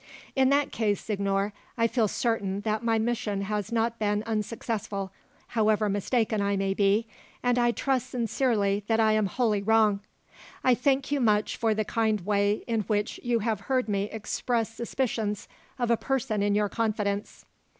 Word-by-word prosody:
"In 265 -1 +4
that 280 0 +2
case, 210 -3 0
signor, 200 -1 -1 0.2
I 230 - +3
shall 230 -1 +2
feel 205 -3 -1
that 215 +1 -1
my 225 -1 +2
mission 220 -3 -1
has 205 +1 -3
not 230 0 0
been 210 0 0
unsuccessful, 215 -2 -3 0.4
however 215 -2 +2
mistaken 215 +2 0
I 200 0 +1
may 195 0 0
be, 200 +3 +2 0.4
and 245 0 +2
I 240 0 +4
trust 260 +1 0
sincerely 225 -4 0
that 225 -1 +2
I 220 -1 +4
am 215 -2 +2
wholly 215 -1 +1
wrong. 215 -1 +3 0.6
I 255 - +5
thank 270 +3 +1
you 285 -2 +1
much 210 -3 +2
for 225 -2 +1
the 215 0 0
kind 220 -2 +1
way 205 0 +1
in 225 -2 0
which 210 0 -1
you 240 -2 0
have 220 -2 0
heard 255 -2 +2
me 200 -1 0
express 225 +2 -2
suspicions 225 -3 -2 0.3
of 240 -2 0
a 235 - +4
person 260 -6 -1
in 205 0 +2
your 210 0 +2
confidence." 210 -2 -2
220 Hz, 170 wpm, -27 LUFS, 205-235 Hz, 0.6 s, I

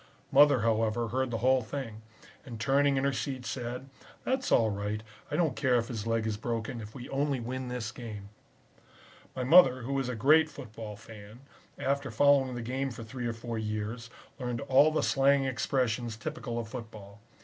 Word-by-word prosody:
Mother, 145 -4 +6
however, 115 +1 +1
heard 130 +2 0
the 115 - -2
whole 130 0 +4
thing, 115 -2 -6 0.4
and 120 -5 -8
turning 140 +3 +3
in 135 - 0
her 140 0 +1
seat 130 -1 -4
said, 125 +1 -4 0.4
'That's 260 0 -1
all 110 -2 +4
right, 105 +2 -3 0.3
I - - -2
don't 160 -7 +1
care 130 -3 +2
if 115 -1 0
his 115 -3 -4
leg 115 -1 0
is 110 -2 -1
broken, 115 +1 -3
if 105 0 -10
we 125 -2 -8
only 140 -1 0
win 130 +2 -4
this 125 -3 -4
game.' 105 -5 -8 1.1
"My 130 - -2
mother, 130 -3 +6
who 135 +3 -1
is 130 -2 -2
a 125 - -3
great 155 +7 +5
football 110 -7 -8
fan, 105 +2 -13 0.4
after 140 0 -1
following 135 +1 +3
the 120 - -4
game 130 +3 -2
for 115 -2 -8
three 120 +2 -5
or 115 - -2
four 115 0 -5
years, 110 +2 -4 0.3
learned 125 -1 -3
all 140 +2 +5
the 155 - 0
slang 135 0 +3
expressions 120 -3 -1
typical 135 -3 -5
of 115 -2 -3
football. 110 -4 -9
125 Hz, 185 wpm, -30 LUFS, 110-135 Hz, 1.1 s, Mother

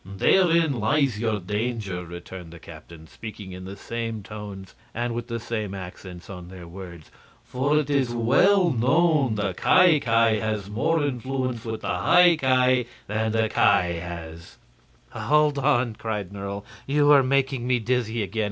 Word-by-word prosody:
"Therein 165 - +2
lies 130 0 +1
your 110 -2 -1
danger," 105 -1 -3
returned 85 0 -10
the 85 - -11
captains, 80 0 -13
speaking 105 -3 -9
in 90 0 -9
the 95 +1 -8
same 115 -1 -5
tones 100 -3 -9 0.2
and 120 +1 -2
with 120 0 -5
the 115 -1 -4
same 110 -4 -4
accents 90 -1 -9
on 90 -3 -9
their 90 -2 -11
words. 85 -2 -11 0.3
"For 140 +4 0
it 150 -2 +1
is 135 -3 +1
well 165 - +3
known 140 0 +2
the 100 -3 -1
Ki 175 - +4
Ki 115 -3 +2
has 105 -2 -3
more 160 +8 +1
influence 130 -3 -3
with 110 -1 -4
the 90 - -2
High 175 - +5
Ki 130 -3 +2 0.2
than 110 +1 -1
the 110 0 +1
Ki 90 -5 +2
has." 85 -1 -9 0.5
"Hold 150 -1 +1
on!" 130 -4 +1
cried 105 -4 -5
Nerle; 100 0 -6 0.2
"you 145 +1 +3
are 140 -2 +7
making 135 -2 0
me 125 -1 +2
dizzy 115 -1 -1
again. 105 +3 -5
115 Hz, 160 wpm, -24 LUFS, 100-135 Hz, 0.5 s, are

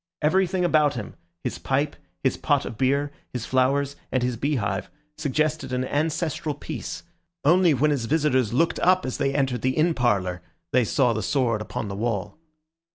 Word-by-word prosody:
Everything 185 +3 +2
about 150 -4 +3
him, 110 -4 -6 0.3
his - - -3
pipe, 145 +2 0 0.3
his - - +2
pot - - +1
of - - -6
beer, 140 +4 +1 0.2
his 125 - -3
flowers, 135 +2 +1 0.2
and 130 -1 +1
his 125 -1 0
beehive, 110 -7 -1 0.3
suggested 150 -1 -1
an 130 0 0
ancestral 155 +1 -1
peace; - - -6 0.4
only 170 0 +5
when 150 +4 +2
his 135 -5 0
visitors 130 -5 +2
looked 165 +8 +1
up 185 +1 +3
as 130 - -3
they 135 -1 +1
entered 130 -4 0
the 130 0 0
inn 165 +2 +3
parlour, 100 - 0 0.3
they 125 - +5
saw 125 +2 +2
the 110 - -2
sword 115 +4 +1
upon 110 0 -4
the 100 - -5
wall. 110 +5 -2
135 Hz, 170 wpm, -25 LUFS, 120-150 Hz, 0.4 s, only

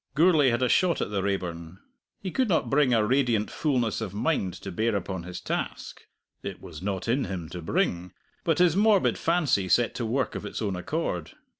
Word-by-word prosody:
Gourlay 155 -3 +5
had 120 +1 +1
a - - +3
shot 175 +6 +3
at - - -2
the 100 -2 0
Raeburn. 90 -3 -3 0.5
He 185 - -3
could 255 +1 +1
not 165 - +1
bring 140 -2 +4
a 110 -3 +3
radiant 120 -4 +1
fullness 125 -7 0
of 95 - -5
mind 110 - 0
to 95 - -6
bear 110 +4 0
upon 95 -1 -3
his 90 +1 -7
task - - -4 0.4
(it - - -6
was 80 -2 -10
not 95 0 -3
in 130 +4 +1
him 85 -5 -5
to 90 - -7
bring), 85 +2 -1 0.3
but 165 -2 +1
his 175 -2 +4
morbid 205 -1 +3
fancy 150 - +1
set 120 +6 +3
to 120 - -3
work 130 +2 0
of - - -5
its 105 - -5
own 100 -4 -1
accord. 90 - -3
115 Hz, 200 wpm, -27 LUFS, 95-150 Hz, 0.5 s, Gourlay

